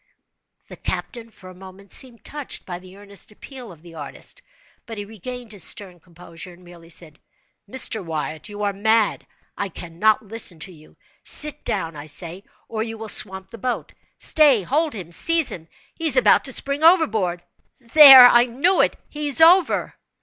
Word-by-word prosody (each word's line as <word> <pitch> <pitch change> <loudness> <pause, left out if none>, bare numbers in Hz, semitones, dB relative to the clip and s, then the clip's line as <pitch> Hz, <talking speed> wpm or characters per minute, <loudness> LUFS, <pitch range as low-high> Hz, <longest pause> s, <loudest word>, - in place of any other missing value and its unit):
The - - -12
captain, 235 -2 -6
for 185 -4 -15
a - - -14
moment, 190 +1 -15
seemed 245 -3 -1
touched 295 -2 -7
by 175 -1 -7
the 185 +1 -16
earnest 200 -1 -8
appeal 250 +1 -12
of 165 -2 -17
the 170 -1 -14
artist, 155 - -8 0.5
but 225 -2 -8
he 205 - -6
regained 230 +3 -9
his 205 -3 -6
stern 180 0 -1
composure, 170 0 -13
and 175 +1 -19
merely 170 -1 -16
said: 160 -3 -7 0.5
"Mr. 225 -4 -2
Wyatt, 155 0 -6
you 210 0 -7
are 200 -1 -1
mad. 220 +2 0 0.3
I 200 - -4
cannot 180 +6 -1
listen 210 -4 -5
to 185 - -5
you. 155 -1 -20 0.2
Sit 300 0 +4
down, 165 -6 -3
I 145 +1 -10
say, 170 +5 -4 0.2
or 220 -1 -5
you 225 0 -5
will 220 0 -7
swamp 190 -2 +2
the 230 - -11
boat. 250 +3 -4 0.2
Stay—hold 295 - +1
him—seize 235 - -1
him!—he 175 - -8
is 315 - +6
about - - +4
to - - +3
spring 280 +2 -2
overboard! 220 - +2 0.4
There—I 250 -2 +8
knew 285 +11 +1
it—he 300 0 -3
is 285 - +2
over!" 345 +3 +4
210 Hz, 165 wpm, -21 LUFS, 175-255 Hz, 0.5 s, There—I